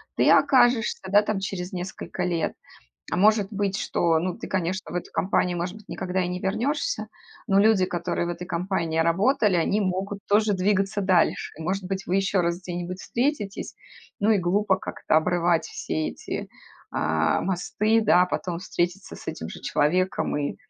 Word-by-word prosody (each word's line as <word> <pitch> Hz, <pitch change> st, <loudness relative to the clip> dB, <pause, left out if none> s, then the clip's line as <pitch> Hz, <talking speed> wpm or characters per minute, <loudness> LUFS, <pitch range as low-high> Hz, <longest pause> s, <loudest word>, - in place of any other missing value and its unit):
ты -, -, +3 dB
окажешься, 245 Hz, -3 st, +4 dB
да, 205 Hz, +2 st, +6 dB
там, 210 Hz, -1 st, -2 dB
через 190 Hz, -1 st, -4 dB
несколько 180 Hz, 0 st, -5 dB
лет. 170 Hz, -3 st, -1 dB, 0.6 s
А -, -, +1 dB
может 210 Hz, +1 st, +4 dB
быть, 200 Hz, -1 st, -1 dB
что 165 Hz, -1 st, +1 dB
ну, 180 Hz, +1 st, -3 dB
ты, -, -, -6 dB
конечно, 190 Hz, +1 st, -2 dB
в -, -, -7 dB
эту 180 Hz, -, -4 dB
компанию, 180 Hz, +1 st, +1 dB
может 175 Hz, +3 st, -3 dB
быть, 215 Hz, -2 st, -16 dB
никогда 185 Hz, 0 st, -2 dB
и -, -, -2 dB
не 180 Hz, 0 st, -4 dB
вернёшься, 275 Hz, -, -1 dB, 0.4 s
но 195 Hz, -, +4 dB
люди, 210 Hz, -3 st, +4 dB
которые 175 Hz, 0 st, -2 dB
в -, -, -2 dB
этой 175 Hz, +1 st, -6 dB
компании 170 Hz, -2 st, -1 dB
работали, 195 Hz, +5 st, +3 dB
они 200 Hz, +5 st, +1 dB
могут 195 Hz, +1 st, -2 dB
тоже 210 Hz, +1 st, +3 dB
двигаться 195 Hz, +2 st, +1 dB
дальше. 185 Hz, -3 st, +2 dB
И -, -, -6 dB
может 190 Hz, +4 st, -1 dB
быть, 195 Hz, +1 st, -4 dB
вы 180 Hz, -, -1 dB
ещё 195 Hz, -1 st, +2 dB
раз 170 Hz, +1 st, -1 dB
где-нибудь 180 Hz, +1 st, -5 dB
встретитесь. 235 Hz, -6 st, -2 dB, 0.5 s
Ну, 205 Hz, +2 st, +3 dB
и 215 Hz, -, +4 dB
глупо 190 Hz, +2 st, +2 dB
как-то 170 Hz, -, -1 dB
обрывать 170 Hz, +1 st, +2 dB
все 155 Hz, -, -3 dB
эти, -, -, -6 dB, 0.4 s
а, 80 Hz, 0 st, +1 dB
мосты, 210 Hz, +4 st, +1 dB
да, 180 Hz, -4 st, +5 dB
потом 180 Hz, -1 st, -3 dB
встретиться 180 Hz, +1 st, -3 dB
с -, -, -13 dB
этим -, -, -5 dB
же -, -, -9 dB
человеком 180 Hz, +6 st, +1 dB
и, 145 Hz, -1 st, -2 dB
185 Hz, 175 wpm, -25 LUFS, 175-205 Hz, 0.6 s, да